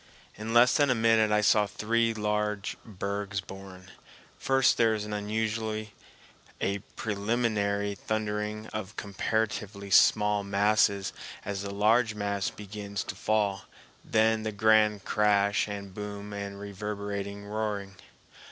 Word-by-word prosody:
In 110 +2 -5
less 120 +2 +6
than 145 -1 +3
a 125 - +3
minute 110 -1 +4
I 105 0 +4
saw 105 0 +4
three 115 +3 +1
large 105 -2 -1
bergs 100 -1 -4
born. 95 0 -10 0.4
First 135 -1 +3
there 115 -1 +4
is 105 -1 -4
usually 110 +1 -2 0.7
a 100 +1 0 0.2
preliminary 105 -1 0
thundering 105 +1 -3
of 110 -1 -5
comparatively 100 0 -2
small 105 +1 +5
masses 100 0 +2 0.3
as 100 -1 -3
the 100 - -5
large 110 +3 +2
mass 100 -2 -1
begins 100 0 -6
to - - -5
fall, 105 -3 0 0.4
then 110 0 +2
the 110 0 -3
grand 105 -1 +3
crash 100 -1 +2
and 100 -2 -6
boom 105 0 -6
and 100 0 -5
reverberating 100 0 -5
roaring. 105 -2 -3
105 Hz, 125 wpm, -28 LUFS, 100-110 Hz, 0.7 s, less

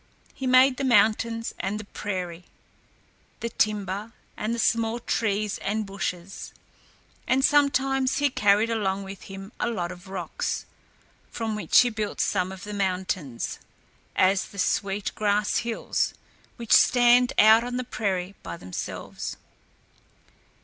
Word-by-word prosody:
He 265 - -4
made 255 +1 +6
the - - -2
mountains 230 -1 +2
and 200 +3 -2
the - - -6
prairie, 180 -4 -5 0.9
the 235 - -3
timber 210 0 -1 0.2
and 220 +2 -2
the - - -5
small 230 0 +1
trees 210 -3 -1
and 215 +1 -2
bushes, 195 -2 -5 0.7
and 265 +1 +3
sometimes 270 -2 +2
he 285 -1 +2
carried 210 0 +3
along 200 -3 -1
with 195 -1 -9
him 195 +1 -8
a - - 0
lot 180 -6 -3
of 180 +1 -11
rocks, 185 -4 -3 0.6
from 225 -2 -3
which 210 - +5
he 245 -1 +1
built 215 -2 -4
some 185 -2 0
of 190 0 -9
the 210 - -6
mountains 185 - -2 0.6
as 190 +1 +3
the 200 - -14
Sweet 200 +1 0
Grass 205 -1 +1
Hills 235 -1 -1 0.4
which 235 -3 -7
stand 245 0 +6
out 220 +2 +7
on 245 0 -3
the 255 - -2
prairie 195 -5 -2
by 85 -1 -7
themselves. 90 0 -6
210 Hz, 135 wpm, -26 LUFS, 195-235 Hz, 0.9 s, out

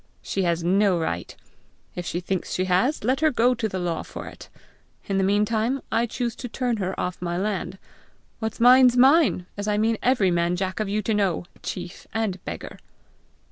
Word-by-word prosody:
"She 195 - -2
has 170 -2 0
no 190 +1 +3
right. 85 - -3 0.6
If 175 -1 -5
she 175 - -2
thinks 185 0 -3
she 185 - 0
has, 190 +11 +1
let 260 +4 +1
her 315 0 +4
go 245 -2 +3
to 220 -2 -2
the 190 - -4
law 175 -3 -2
for - - -8
it. - - -11 0.6
In 195 -1 0
the - - +2
meantime 215 +6 +1
I 235 +1 +1
choose 235 0 -3
to 245 - -6
turn 245 -1 -1
her 190 -2 -3
off 180 0 -3
my 175 -1 -2
land. 195 -1 -2 0.6
What's 220 -1 -4
mine's 250 +1 +7
mine, 270 - +5
as 205 +1 -4
I 210 -1 +1
mean 220 +1 +1
every 245 -8 +3
man 170 0 +1
jack 185 +2 -3
of 215 -2 -1
you 210 +1 -1
to 220 - 0
know 195 -5 0 0.2
chief 180 -1 -7
and 205 -5 -2
beggar!" - - -7
205 Hz, 195 wpm, -24 LUFS, 180-235 Hz, 0.6 s, mine's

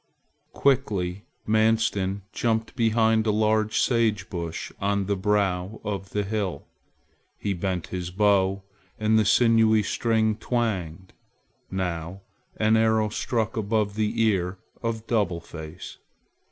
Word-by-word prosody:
Quickly 100 -8 0 0.2
Manstin 110 -3 +1
jumped 115 -1 -1
behind 110 -1 +2
a - - +4
large 110 0 +2
sage 110 -6 +1
bush 85 -3 -4
on 100 0 0
the 100 +1 0
brow 100 0 0
of 100 -2 -4
the 105 0 -1
hill. 100 -7 -3 0.7
He 100 - -2
bent 90 -1 -2
his 90 -1 -3
bow 100 0 +2 0.4
and 110 +1 +3
the 110 - +2
sinewy 110 -1 +4
string 110 0 +1
twanged. 95 -8 -2 0.6
Now 90 -1 -3 0.4
an 110 +1 +3
arrow 110 -1 +3
stuck 110 +1 -2
above 105 -1 0
the 110 +2 -1
ear 95 -4 +1 0.2
of 115 -1 -3
Double 105 -8 0
Face. 80 +1 -9
105 Hz, 120 wpm, -25 LUFS, 95-110 Hz, 0.7 s, a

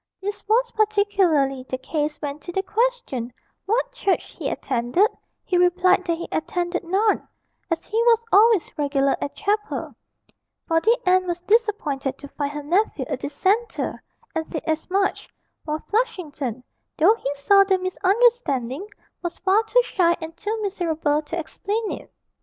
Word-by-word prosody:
This 410 +1 -5
was 475 +3 +2
particularly 395 -11 +2
the 260 - -2
case 295 +3 -2
when 290 0 -3
to 350 - -8
the 385 +2 -1
question 440 - -1 0.4
'what - - +1
church 400 -6 -1
he - - -4
attended,' 255 - +1 0.3
he 360 -1 +1
replied 365 +1 +3
that 335 -1 +1
he 340 - -6
attended 350 +2 -2
none, 395 +5 +1 0.4
as 330 -2 -2
he 445 +2 0
was 465 -1 +4
always 425 -1 +4
regular 275 -1 +2
at 285 - -4
chapel: 420 +1 -2 0.7
for 325 0 +3
the 460 +6 +4
aunt 370 0 +3
was 345 0 -2
disappointed 355 - 0
to 285 - -10
find 285 -1 -3
her 295 0 -6
nephew 330 -3 +1
a - - 0
Dissenter, 390 - -1 0.3
and 320 -1 -2
said 315 - -5
as 315 +2 -2
much; 390 +1 0 0.4
while 310 0 -3
Flushington, 300 - -2 0.3
though 345 +7 +6
he 280 -11 -3
saw 395 +8 +5
the 385 -1 +2
misunderstanding, 370 - +1 0.3
was 345 -2 -4
far 390 +3 +3
too - - +4
shy 345 -7 +2
and 325 -1 -7
too 430 +4 -3
miserable 325 -6 0
to 310 +3 -5
explain 410 +7 -3
it. - - -8
365 Hz, 155 wpm, -23 LUFS, 300-420 Hz, 0.7 s, though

